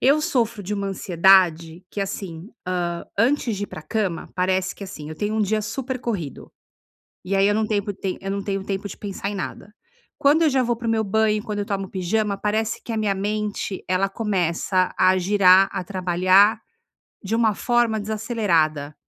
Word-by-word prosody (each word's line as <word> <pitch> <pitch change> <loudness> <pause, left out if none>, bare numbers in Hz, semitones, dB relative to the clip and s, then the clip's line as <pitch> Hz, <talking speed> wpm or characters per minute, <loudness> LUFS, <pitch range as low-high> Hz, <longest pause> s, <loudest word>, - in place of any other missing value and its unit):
eu 280 +4 +4
sofro 235 -9 0
de 190 - -5
uma 200 -1 -2
ansiedade 180 -2 +3
que, 205 - -4
assim, 190 -2 -5 0.2
hã, 175 -2 -2
antes 235 -2 +2
de 205 - -2
ir - - -8
para 155 - -9
a - - -15
cama, 185 0 -2
parece 185 0 +1
que, 200 - -8
assim, 155 -5 -8
eu 155 - -6
tenho 210 +3 -2
um 220 - +1
dia 215 +2 +1
super 255 +4 -4
corrido 185 - -5 0.7
e 195 +1 -1
aí 195 +1 +4
eu 205 - +3
não 220 0 +1
tempo 205 -1 -1
tem 190 -1 -4
eu 195 - -4
não 200 0 -2
tenho 195 -1 -3
tempo 200 +1 -3
de - - -9
pensar 200 -1 -5
em - - -5
nada. 200 +2 -6 0.5
Quando 295 +4 +4
eu 315 - +5
já 265 -1 +2
vou 240 -1 0
para 235 0 -6
o - - +2
meu 220 -1 +1
banho, 215 +1 +1
quando 210 -3 -4
eu 200 - -3
tomo 195 -2 -3
pijama, 200 +2 -1
parece 215 +2 -1
que - - -9
a - - -2
minha 210 -2 +1
mente, 205 0 -3
ela 185 +2 +2
começa 185 -3 0
a 185 0 +5
girar, 190 0 +5
a 180 - -3
trabalhar, 185 +3 +3 0.7
de 205 +3 -3
uma 225 -3 +2
forma 240 -3 +1
desacelerada. 185 - 0
200 Hz, 200 wpm, -23 LUFS, 185-220 Hz, 0.7 s, eu